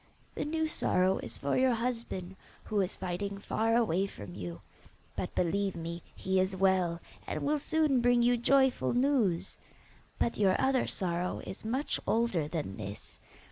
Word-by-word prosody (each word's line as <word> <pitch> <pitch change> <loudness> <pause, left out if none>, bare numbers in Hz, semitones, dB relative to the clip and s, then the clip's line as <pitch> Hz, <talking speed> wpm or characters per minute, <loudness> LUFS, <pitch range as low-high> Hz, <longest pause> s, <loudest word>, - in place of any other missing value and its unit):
The - - -3
new 320 +1 0
sorrow 185 -10 +2
is - - -5
for 140 - -1
your 255 -1 +3
husband, 230 -6 -3 0.3
who 210 -2 0
is 185 - -1
fighting 195 +2 -3
far 225 +3 0
away 200 -5 +2
from 100 - -9
you; 85 -3 -6 0.6
but, - - -4
believe 195 +2 +1
me, 170 +1 -5
he 190 0 0
is 190 +1 +1
well, 185 -3 +2 0.3
and - - -3
will 295 +1 +1
soon 305 -4 +2
bring 245 0 +4
you 245 +1 +4
joyful 265 +2 +3
news. 245 -9 +1 0.6
But 235 - 0
your 190 -2 +3
other 265 -1 +2
sorrow 180 -1 -1
is 190 - -7
much 255 +7 -1
older 220 -10 +1
than 150 - -4
this. 100 -1 -8
200 Hz, 160 wpm, -31 LUFS, 175-245 Hz, 0.6 s, bring